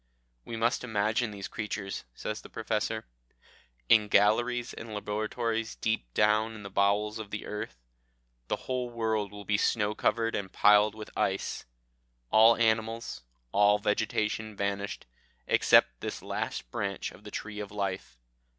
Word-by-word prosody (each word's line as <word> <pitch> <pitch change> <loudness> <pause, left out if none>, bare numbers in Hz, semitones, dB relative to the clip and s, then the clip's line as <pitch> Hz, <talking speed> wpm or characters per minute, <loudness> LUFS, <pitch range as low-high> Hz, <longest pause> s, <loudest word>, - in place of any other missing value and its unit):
"We 115 - -5
must 120 +4 +1
imagine 110 0 0
these 100 -2 -6
creatures," 105 -3 -4
says 110 +1 -4
the - - -12
Professor, 110 0 -2 0.8
"in 105 - +6
galleries 120 +4 +3
and 110 -1 -7
laboratories 110 +2 -2
deep 85 - -2
down 110 +1 +3
in 105 - -9
the 100 - -8
bowels 105 +2 +2
of 110 -2 -6
the 105 - -5
earth. 105 -11 -5 0.7
The - - +1
whole 125 -1 -2
world 110 -3 -1
will 105 0 -9
be 100 +1 +2
snow 105 0 +1
covered 115 +1 +1
and 95 -2 -3
piled 105 +1 +5
with 110 -1 -9
ice; 95 0 -1 0.7
all 115 +1 +7
animals, 115 - 0 0.3
all 105 0 +5
vegetation 105 +1 -1
vanished, 100 0 -3 0.4
except - - +4
this - - -5
last - - -4
branch 100 -1 -3
of 100 - -16
the 105 - -8
tree 105 0 -6
of 105 -1 -5
life. 95 -12 -3
105 Hz, 145 wpm, -29 LUFS, 105-110 Hz, 0.8 s, all